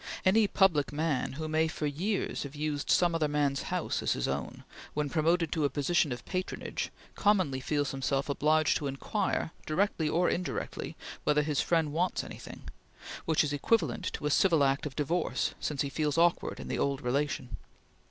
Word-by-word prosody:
Any 210 +3 +5
public 175 -9 +3
man 150 -3 -1
who 155 +3 -4
may 160 +1 +2
for 160 -1 -3
years 180 +8 -1
have 140 0 -6
used 150 -1 -2
some 175 -1 +4
other 160 -2 +1
man's 145 -2 +1
house - - -1
as - - +1
his - - -2
own, - - -4 0.3
when 150 -2 -1
promoted 165 +1 +2
to 160 -3 0
a 145 - +3
position 145 +2 +1
of 125 0 -5
patronage 185 -1 -3 0.2
commonly 185 -11 +2
feels 145 +1 -1
himself 135 0 -1
obliged 155 +2 +2
to 145 - -3
inquire, 150 +5 -1 0.2
directly 165 -1 +1
or 175 +3 +2
indirectly, 180 - -3 0.3
whether 150 0 +3
his 150 -2 +1
friend 160 -4 +1
wants 180 +3 0
anything; - - -10 0.6
which 160 -1 +3
is 145 -1 -2
equivalent 150 - +1
to - - -5
a 150 - +1
civil 165 -2 +4
act 140 +2 +1
of 135 - -9
divorce, 160 +4 0
since 145 -2 -1
he 140 - -3
feels 150 +1 0
awkward 170 +1 +2
in - - -7
the - - -2
old 140 0 0
relation. 130 0 -1
150 Hz, 180 wpm, -30 LUFS, 140-170 Hz, 0.6 s, Any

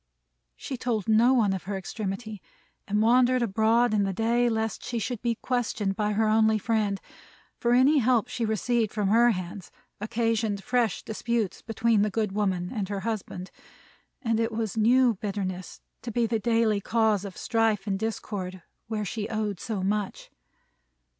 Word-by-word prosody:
She 265 - -6
told 230 -5 -2
no 225 +3 +5
one 210 -6 +3
of 190 - -5
her 195 0 -3
extremity, 205 +2 -5 0.5
and 210 +1 +1
wandered 250 +2 +4
abroad 225 +2 +2
in 210 - +3
the 195 -1 0
day 235 +4 +2
lest 220 -2 -2
she 240 - -3
should 225 +1 -3
be 235 -1 0
questioned 220 -5 -1
by 210 0 0
her 220 +1 +2
only 220 0 +4
friend: 210 -2 0 0.6
for 240 0 +2
any 270 +4 +5
help 245 -2 +2
she 245 -1 -3
received 220 +1 0
from 210 -3 -1
her 235 +3 +5
hands, 185 -2 -4 0.3
occasioned 220 -1 -1
fresh 245 0 0
disputes 220 -2 -2
between 225 -1 +1
the 210 - +2
good 210 0 -1
woman 190 -3 -1
and 205 -5 -3
her 200 -1 -3
husband; 195 -4 -4 0.7
and 225 -2 +1
it 230 0 0
was 220 -1 -3
new 240 +3 +4
bitterness 190 -3 -4 0.2
to 240 - -5
be 235 +1 +1
the 225 0 0
daily 225 -1 +2
cause 220 -2 +1
of 200 -2 -8
strife 225 -4 +1
and 195 -2 -1
discord, 195 -4 -4 0.2
where 215 -2 -2
she 215 +2 -4
owed 215 -4 -2
so 210 -5 -3
much. 205 0 -2
220 Hz, 165 wpm, -27 LUFS, 200-230 Hz, 0.7 s, no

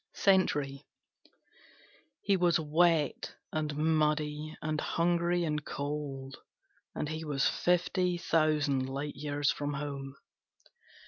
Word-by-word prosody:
Sentry 145 -8 +2 1.4
He 200 - +2
was 175 -3 +3
wet 160 -1 +1 0.2
and 150 -2 -2
muddy 155 -1 0
and 155 0 -2
hungry 175 +1 +1
and 150 -2 -1
cold, 140 -2 -5 0.6
and - - -2
he 160 +1 -4
was 145 -3 +1
fifty 180 0 +1
thousand 150 -5 +1
light 140 +2 -4
years 145 0 0
from 145 0 -3
home. 140 -1 -5
150 Hz, 105 wpm, -31 LUFS, 145-165 Hz, 1.4 s, was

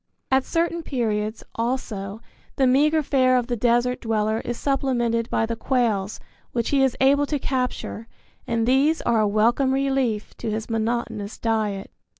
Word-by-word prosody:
At 265 0 +3
certain 335 0 0
periods, 220 -7 -2
also, 225 -4 -3 0.3
the 270 - +3
meagre 300 +5 +3
fare 255 -2 +3
of 245 - 0
the 240 0 -2
desert 240 +2 +1
dweller 220 -1 0
is 240 -1 -4
supplemented 240 -4 0
by 225 - +1
the 230 +1 -3
quails 225 -5 0 0.3
which 235 -2 -1
he 280 -1 +3
is 265 -3 +1
able 280 +2 +4
to 295 - 0
capture 250 -4 -3 0.4
and 230 -1 0
these 275 +6 +3
are 235 -2 +2
a 215 - +3
welcome 235 +6 +2
relief 270 -6 -1
to 230 - -4
his 220 +1 -3
monotonous 225 -2 -2
diet. 215 -4 -1
240 Hz, 155 wpm, -23 LUFS, 220-265 Hz, 0.4 s, able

